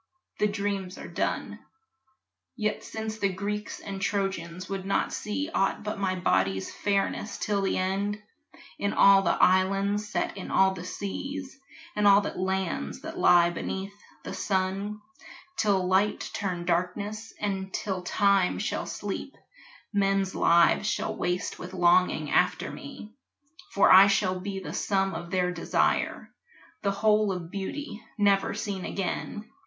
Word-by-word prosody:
The 210 - +3
dreams 200 -2 -3
are - - -8
done; - - -2 1.0
Yet 215 -3 -2
since 220 0 -5
the 200 - +2
Greeks 205 +2 -4
and 195 -1 -6
Trojans 185 -3 -2
would 195 -1 -4
not 195 +1 0
see 285 +9 -3
Aught 195 +2 +1
but 210 -1 -4
my 190 -2 0
body's 95 - 0
fairness, 200 +1 -1
till 205 -2 0
the 195 - 0
end, 195 +3 -1 0.6
In 200 - 0
all 195 0 +7
the 180 - +1
islands 195 +3 +3
set - - -2
in 190 - -6
all 190 0 +4
the 180 -1 -7
seas, 270 +10 -5 0.4
And 210 -1 +3
all 200 0 +8
the - - -3
lands 185 - -2
that - - -7
lie 175 -1 +6
beneath 190 +3 -4 0.3
the - - -6
sun, 195 +2 -1 0.5
Till 195 - +2
light 195 +3 +1
turn 180 -4 -3
darkness, 200 +5 -2
and 195 -2 -2
till 190 -2 -3
time 195 0 +2
shall - - -2
sleep, - - -5 0.6
Men's 195 -1 +1
lives 170 +5 +4
shall - - -2
waste 180 0 -2
with 185 +1 -8
longing 180 +1 +3
after - - +2
me, 215 +1 -10 0.6
For 200 - +5
I 190 +2 +10
shall 195 -2 +1
be 195 +1 -4
the - - -7
sum 195 -1 0
of 170 +1 -6
their 180 -1 +1
desire, 170 -1 0 0.5
The 200 - +1
whole 210 +1 +2
of 180 -2 -5
beauty, 210 +5 -5
never 200 -1 +2
seen 200 -3 -4
again. 200 +2 -3
195 Hz, 145 wpm, -27 LUFS, 185-205 Hz, 1.0 s, I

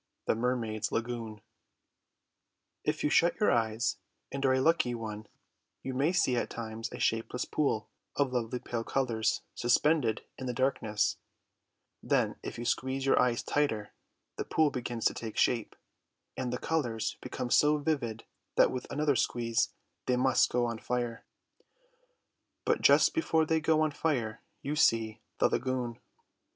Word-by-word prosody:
THE - - +3
MERMAIDS' 115 -2 -1
LAGOON 115 -2 -3 1.4
If 150 0 -1
you 150 - +2
shut 170 +1 +3
your 210 - +4
eyes 115 0 +1 0.3
and 140 0 -3
are 130 - +4
a 130 - +2
lucky 130 -4 +2
one, 110 -2 -6 0.6
you 130 - -3
may 140 +6 +2
see 135 -8 +2
at - - -1
times 115 0 -5
a - - -7
shapeless 115 +3 0
pool 125 -8 0 0.3
of 140 -3 +1
lovely 120 0 -1
pale 120 -1 -4
colours 115 -4 0
suspended 120 -1 +2 0.2
in 130 - -4
the 125 - -2
darkness; 115 -5 +1 0.8
then - - +1
if - - -6
you 120 - -5
squeeze 130 +2 -1
your 135 - +4
eyes 120 -2 +1
tighter, 115 -8 -1 0.4
the - - -1
pool 155 -2 +2
begins 120 -3 -4
to - - +4
take 110 -2 -6
shape, 115 -3 +1 0.6
and 125 -2 -3
the 125 - -1
colours 120 -10 -1
become 125 - -4
so 150 0 +5
vivid 140 -7 -2 0.3
that - - +5
with 125 - -5
another 150 -1 +1
squeeze 115 -2 +1 0.4
they 125 - +2
must 130 +1 +3
go 120 0 +1
on 115 -1 -3
fire. 120 -1 -3 1.4
But - - +2
just - - +6
before 165 - +2
they 160 0 +2
go 155 0 +2
on 155 -1 +2
fire 125 -8 -1 0.2
you 145 +2 -2
see 115 -6 +2 0.2
the - - +4
lagoon. 125 -2 -2
125 Hz, 155 wpm, -30 LUFS, 115-140 Hz, 1.4 s, just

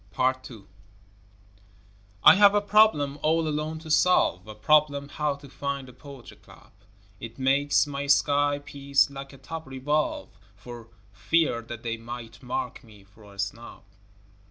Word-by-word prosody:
Part 130 +7 -1
II 110 -5 -12 1.6
I - - +10
have 205 +1 +5
a - - +5
problem 205 -9 +2
all 160 +1 +1
alone 155 +1 -3
to 160 -1 -8
solve, 110 - +2
A 110 - -9
problem 145 +4 +2
how 150 -1 -2
to 140 0 -14
find 140 0 -5
the 125 - -13
poetry 135 -1 -13
club, - - -19 0.5
It 115 0 -9
makes 140 +3 +2
my 140 -1 -5
sky 145 0 +2
piece 140 -1 0
like 135 0 -9
a 135 - -14
top 160 +3 -8
revolve, 140 +3 -2 0.3
For 115 +2 -11 0.3
fear 160 -8 0
that 115 0 -9
they 115 -1 -3
might 115 0 -9
mark 125 -1 -5
me 105 -4 -17
for 100 +1 -19
a 100 - -17
snob. 105 +4 -6
140 Hz, 155 wpm, -26 LUFS, 120-150 Hz, 1.6 s, I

